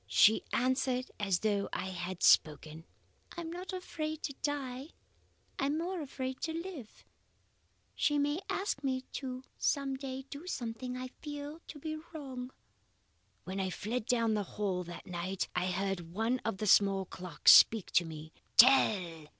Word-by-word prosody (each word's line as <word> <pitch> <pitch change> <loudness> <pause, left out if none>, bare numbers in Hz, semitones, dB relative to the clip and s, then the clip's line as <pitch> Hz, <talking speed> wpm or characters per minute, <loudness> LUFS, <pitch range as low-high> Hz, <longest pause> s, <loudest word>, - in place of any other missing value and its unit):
She 220 +1 +5
answered 255 0 0
as 195 -4 +1
though 205 -2 0
I 190 - -3
had 180 0 -5
spoken. 155 +1 +3 0.5
"'I - - -3
am 330 -1 -6
not 360 +3 -6
afraid 315 -4 -4
to 280 - -3
die. 275 -1 -3 0.7
I 275 - +1
am 295 +2 0
more 350 +1 -2
afraid 260 -2 -5
to 320 - -2
live. 330 - -7 0.9
She 295 -2 +1
may 290 +3 +1
ask 385 -7 -2
me 260 -1 -1 0.6
some 275 -2 +1
day 265 0 -5
to - - -34
do 345 - -12
something 250 -4 -4
I 255 0 -5
feel 295 +1 -6
to 305 - -9
be 310 +2 -4 0.2
wrong.' 260 -4 -6 0.9
"When 190 +1 -5
I 190 -1 0
fled 215 +5 -3
down 230 -3 +2
the 210 - +1 0.2
hall 190 -3 0
that 175 0 -9
night, 185 +1 -3
I 180 0 +1
heard 185 -2 -2
one 225 +7 0
of 225 -4 -3
the 215 - -3
small 195 -1 +4
clocks 180 -4 +3
speak 220 -4 +7
to 175 - +4
me. 155 -1 -9 0.2
Tell! 185 - +5
250 Hz, 160 wpm, -32 LUFS, 190-285 Hz, 0.9 s, speak